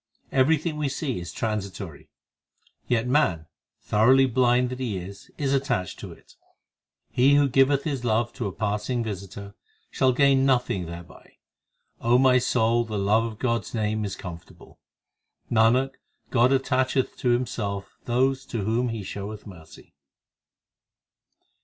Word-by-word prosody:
Everything 150 +4 +2
we 150 -2 -1
see 135 - -3
is 85 -1 -7
transitory; 100 -7 -5 0.8
Yet 120 -1 +1
man, 125 - +1 0.4
thoroughly 130 +6 +4
blind 125 0 +2
that 130 - -6
he 115 -7 -2
is, 95 +2 -9
is 140 -2 0
attached 130 - -1
to - - -8
it. - - -18 0.7
He 135 +3 +4
who 145 -1 +4
giveth 135 +1 +3
his 140 -5 -3
love 120 0 0
to 120 -5 -3
a - - -4
passing 110 +4 -2
visitor, 100 -1 -7 0.4
Shall 130 -1 +2
gain 135 +1 +3
nothing 125 -9 +1
thereby. 85 +1 -11 0.7
my 125 +2 +5
soul, 120 -1 +2
the 110 -2 -5
love 105 +3 +2
of 110 -2 -6
God 115 -1 0
s 110 - -9
name 110 -1 -1
is 100 -2 -4
comfortable. 85 -2 -11 0.7
Nanak, 120 +4 +3 0.4
God 125 0 +4
attacheth 130 0 +1
to 125 - 0
Himself 110 -5 -2
those 130 +2 +1
to 115 -4 -3
whom 115 +4 0
He 115 -3 -4
showeth 100 +2 -7
mercy. 85 -6 -14
120 Hz, 140 wpm, -25 LUFS, 105-130 Hz, 0.8 s, my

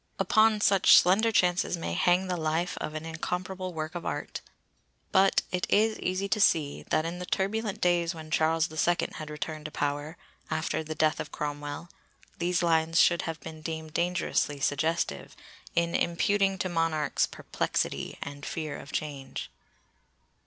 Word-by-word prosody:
Upon 215 +2 +4
such 195 -3 +6
slender 205 +6 +4
chances 180 -3 +2
may 125 - -3
hang 180 - +3
the 180 -1 -1
life 160 +2 -1
of 155 - -5
an 155 +1 -5
incomparable 180 +3 -4
work 160 0 -4
of 175 - -5
art! - - -4 0.7
But 190 +1 +4
it 180 -1 -1
is 215 +1 +3
easy 185 +2 -1
to 215 - +1
see 155 -7 +3
that 155 +1 +2
in 170 +2 -4
the 180 - -5
turbulent 205 +2 -1
days 175 -1 +2
when 155 -1 -9
Charles 160 +1 +2
the 155 - -10
Second 175 +2 +1
had 155 -1 -6
returned 150 0 -5
to 155 - -5
power, 145 +3 -2 0.3
after 160 0 -1
the 155 0 -5
death 155 0 +2
of 145 - -5
Cromwell, 145 +2 -5 0.5
these 175 +1 +1
lines 165 0 +3
should 170 -1 +5
have 165 -1 -5
been 160 +1 -9
deemed 160 -1 -5
dangerously 170 -4 0
suggestive, 155 +4 -1 0.4
in 170 0 +1
imputing 195 +3 +1
to 185 - -1
monarchs 165 -3 +1
'perplexity' - - -3
and 145 0 -9
'fear 155 -2 -4
of 140 - -11
change. 140 -3 -5
165 Hz, 160 wpm, -28 LUFS, 155-180 Hz, 0.7 s, such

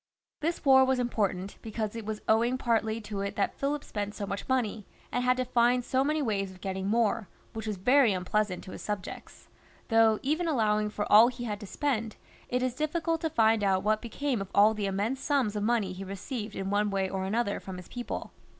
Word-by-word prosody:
This 330 +1 -2
war 265 -1 +7
was 260 0 +2
important, 200 -6 -1
because 220 -1 -4
it 225 -2 -6
was 215 -1 -4
owing 235 +3 +3
partly 225 -2 0
to 210 -2 -5
it 200 0 -3
that 200 - 0
Philip 285 +1 -2
spent 205 0 -4
so 205 - -4
much 200 +4 -5
money, 220 -6 0 0.2
and 245 - 0
had 250 0 +3
to 255 - 0
find 245 0 +2
so 260 0 +2
many 305 +1 0
ways 200 -5 -1
of 185 -1 -13
getting 190 +1 -3
more, 225 -1 +1 0.3
which 220 0 -5
was 210 -2 -2
very 250 +4 +4
unpleasant 185 +1 -1
to 185 - -9
his - - -8
subjects; 205 -3 -6 0.4
though, 225 -1 +5
even 315 +5 0
allowing 215 -7 +1
for 210 0 -3
all 220 +3 +9
he 245 -1 -5
had 210 -3 -3
to 205 - -8
spend, 230 -4 -2 0.3
it 250 +1 0
is 255 -1 0
difficult 320 +3 -1
to 325 - 0
find 220 -5 +3
out 190 -1 +2
what 215 +1 +1
became 245 0 -2
of 195 - -6
all 210 +2 +6
the 210 -2 -2
immense 205 +7 -1
sums 265 -8 +1
of 210 - -1
money 210 -4 +1
he 185 +1 -7
received 205 +3 -5
in 195 0 -3
one 205 +1 +2
way 195 -1 0
or 190 0 -3
another 205 +2 0
from 190 -1 -8
his 180 - -10
people. 245 -1 -5
220 Hz, 220 wpm, -29 LUFS, 200-250 Hz, 0.4 s, all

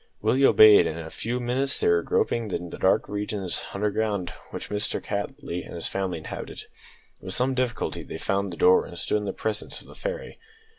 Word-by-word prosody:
Willie 135 +2 +4
obeyed, 110 -1 +8
and 80 - -4
in 85 - -6
a 80 - -9
few 120 +2 -3
minutes 130 +3 0
they - - +1
were 85 0 +4
groping 115 +5 0
in 90 -2 -4
the - - -8
dark 95 - +3
regions 100 -3 -2
underground 105 -3 -1 0.2
which - - -7
Mr 105 0 0
Cattley 100 -4 -4
and - - -10
his 85 - -5
family 95 -3 -2
inhabited. 80 - -7 0.6
With 95 0 -2
some 130 +2 +2
difficulty 125 -3 -1
they - - -7
found 100 -1 -1
the 85 - -7
door, 90 - +5
and 85 - -10
stood 105 - +1
in 105 - -3
the 100 - -1
presence 105 +2 -3
of - - -16
"the - - -13
fairy." - - -5
105 Hz, 205 wpm, -26 LUFS, 90-120 Hz, 0.6 s, obeyed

